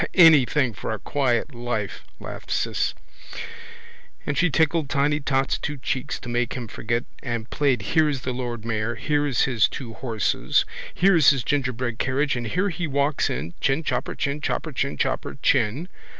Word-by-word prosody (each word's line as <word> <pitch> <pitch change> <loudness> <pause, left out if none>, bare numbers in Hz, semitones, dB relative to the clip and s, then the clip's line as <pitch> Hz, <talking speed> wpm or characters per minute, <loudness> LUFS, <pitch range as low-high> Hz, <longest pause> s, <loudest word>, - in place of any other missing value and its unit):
—Anything 150 -6 +6
for 95 - -4
a 110 - -2
quiet 135 +3 0
life, 120 -4 -3 0.2
laughed - - -8
Ciss. - - 0 1.3
And 150 - -1
she 180 +3 +3
tickled 160 -1 +2
tiny 145 0 +2
tot's 135 -2 0
two 150 -1 -4
cheeks 130 -1 -3
to - - -8
make 120 0 0
him 125 -3 -5
forget 115 +2 -2 0.2
and 115 -3 -3
played 135 -7 +1
here's 150 +2 +2
the 130 - -3
lord 120 -3 -4
mayor, 115 +1 -1
here's 145 -1 +1
his 120 -5 +3
two 120 -5 -7
horses, 115 -3 0 0.3
here's 175 -6 +5
his 135 -4 +2
gingerbread 125 -3 -1
carriage 140 +2 +1
and 120 -1 -3
here 185 - 0
he 175 -1 -3
walks 140 +1 +1
in, 75 +7 -4
chinchopper, 145 +4 0
chinchopper, 150 +2 -2
chinchopper 135 +1 -1
chin. 135 +6 +2
135 Hz, 150 wpm, -24 LUFS, 120-145 Hz, 1.3 s, Anything